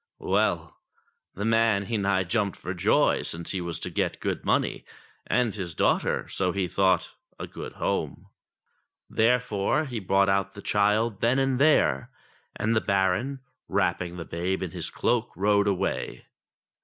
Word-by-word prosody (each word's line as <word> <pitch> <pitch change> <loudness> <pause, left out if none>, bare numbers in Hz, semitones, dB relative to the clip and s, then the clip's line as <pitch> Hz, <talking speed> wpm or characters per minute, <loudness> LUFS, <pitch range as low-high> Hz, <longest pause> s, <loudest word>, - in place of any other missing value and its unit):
Well! 355 - 0 0.6
the 105 - -3
man 115 -3 +3
he 115 - -2
nigh 100 -2 +1
jumped 100 0 -1
for 90 - -5
joy, 90 - +3
since 85 +1 -3
he 95 - -2
was 85 -1 -4
to - - -3
get - - -1
good - - -3
money, - - 0 0.4
and 120 -4 +1
his 90 -6 -5
daughter, - - +1
so 90 -2 0
he 95 0 -1
thought, 95 -1 +2 0.3
a - - -4
good - - -8
home. - - -2 0.9
Therefore 125 +4 +2
he 120 -5 -4
brought 95 0 +2
out 95 0 +1
the 100 - -9
child 105 +1 +2
then 120 +3 +2
and 135 -1 +1
there, 140 -4 +3 0.5
and 110 +2 0
the 110 - +3
Baron, 100 +8 0 0.3
wrapping 90 0 -1
the 85 - -6
babe 90 +3 -2
in 90 - -4
his 85 -1 -3
cloak, 120 -1 0
rode 100 +1 +2
away. 100 -3 -2
100 Hz, 155 wpm, -26 LUFS, 95-115 Hz, 0.9 s, man